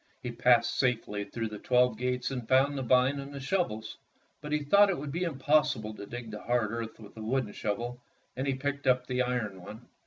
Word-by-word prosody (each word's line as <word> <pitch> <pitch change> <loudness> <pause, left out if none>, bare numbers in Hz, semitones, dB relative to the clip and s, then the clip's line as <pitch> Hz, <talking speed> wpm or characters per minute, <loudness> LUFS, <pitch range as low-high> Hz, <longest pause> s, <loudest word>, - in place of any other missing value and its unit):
He 125 - -3
passed 120 0 +3
safely 110 -5 0
through 115 0 -4
the 105 -1 -7
twelve 125 -2 +3
gates 125 +2 -1
and 125 -4 -4
found 135 +2 +4
the 135 - -2
vine 130 +3 +3
and 140 +1 -7
the 140 - -6
shovels, 130 - -2 0.4
but 150 - -7
he 150 -1 +1
thought 200 +8 +6
it 190 - 0
would 145 0 -5
be 170 - -3
impossible 145 -6 +1
to 100 -1 -9
dig 120 -1 -7
the 105 - -7
hard 120 -3 0
earth 115 -1 -5
with 105 -2 -12
the 110 - -9
wooden 115 -1 -1
shovel, 120 +4 -3 0.3
and 130 +2 -2
he 135 - +1
picked 140 +1 -3
up 125 -1 +3
the 125 0 0
iron 120 -7 -2
one. 110 +6 -11
125 Hz, 220 wpm, -30 LUFS, 110-135 Hz, 0.4 s, thought